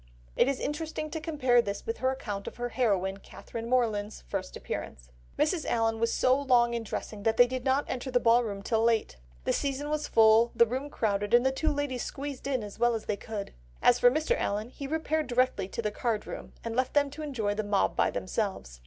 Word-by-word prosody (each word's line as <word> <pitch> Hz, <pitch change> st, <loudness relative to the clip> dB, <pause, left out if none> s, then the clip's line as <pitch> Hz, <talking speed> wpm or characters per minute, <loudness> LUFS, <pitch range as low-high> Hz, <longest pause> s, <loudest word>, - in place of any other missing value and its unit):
It -, -, +4 dB
is 275 Hz, -1 st, 0 dB
interesting 310 Hz, +1 st, -3 dB
to 320 Hz, -, -4 dB
compare 265 Hz, -7 st, +3 dB
this 200 Hz, -3 st, -5 dB
with 455 Hz, +1 st, -3 dB
her 260 Hz, -, +2 dB
account 205 Hz, -7 st, -4 dB
of -, -, -6 dB
her 245 Hz, 0 st, -3 dB
heroine, 195 Hz, -6 st, 0 dB
Catherine 230 Hz, +3 st, -8 dB
Morland's 220 Hz, -4 st, 0 dB
first -, -, -4 dB
appearance: -, -, -6 dB, 0.3 s
"Mrs. 310 Hz, +1 st, +1 dB
Allen 225 Hz, -1 st, +1 dB
was 230 Hz, 0 st, +1 dB
so 260 Hz, +2 st, +3 dB
long 240 Hz, -3 st, +3 dB
in 235 Hz, -, -1 dB
dressing, 215 Hz, -1 st, -5 dB
that 225 Hz, +2 st, +1 dB
they 245 Hz, -, +8 dB
did 255 Hz, 0 st, -4 dB
not 270 Hz, +2 st, +2 dB
enter 255 Hz, +1 st, -4 dB
the 250 Hz, -1 st, +3 dB
ball 235 Hz, +1 st, +4 dB
room 200 Hz, -3 st, -5 dB
till 225 Hz, +1 st, +1 dB
late. 225 Hz, -, +1 dB, 0.3 s
The -, -, +1 dB
season 285 Hz, +1 st, -2 dB
was 305 Hz, 0 st, -1 dB
full, 225 Hz, +1 st, +5 dB
the 235 Hz, -, +6 dB
room 260 Hz, +5 st, -4 dB
crowded, 205 Hz, -4 st, +1 dB
and 240 Hz, +1 st, +4 dB
the 265 Hz, -, +4 dB
two 305 Hz, +4 st, 0 dB
ladies 285 Hz, -4 st, -2 dB
squeezed 275 Hz, -1 st, -5 dB
in 260 Hz, -5 st, 0 dB
as 205 Hz, +1 st, -9 dB
well 240 Hz, 0 st, +3 dB
as 220 Hz, -, -5 dB
they 210 Hz, -, -1 dB
could. 205 Hz, 0 st, -6 dB, 0.3 s
As 245 Hz, -, +4 dB
for 245 Hz, -, +7 dB
Mr. 310 Hz, -, +1 dB
Allen 210 Hz, -, -2 dB
he 275 Hz, +2 st, -7 dB
repaired 315 Hz, 0 st, -1 dB
directly 250 Hz, -6 st, +1 dB
to 230 Hz, -, -5 dB
the 210 Hz, -, 0 dB
card 215 Hz, 0 st, -2 dB
room -, -, -8 dB
and 230 Hz, -1 st, -4 dB
left 255 Hz, +2 st, 0 dB
them 285 Hz, -1 st, +3 dB
to 300 Hz, +2 st, -8 dB
enjoy 250 Hz, -9 st, -2 dB
a 205 Hz, +1 st, -1 dB
mob 205 Hz, -2 st, +1 dB
by -, -, +3 dB
themselves. 185 Hz, -, -3 dB
240 Hz, 225 wpm, -29 LUFS, 215-275 Hz, 0.3 s, they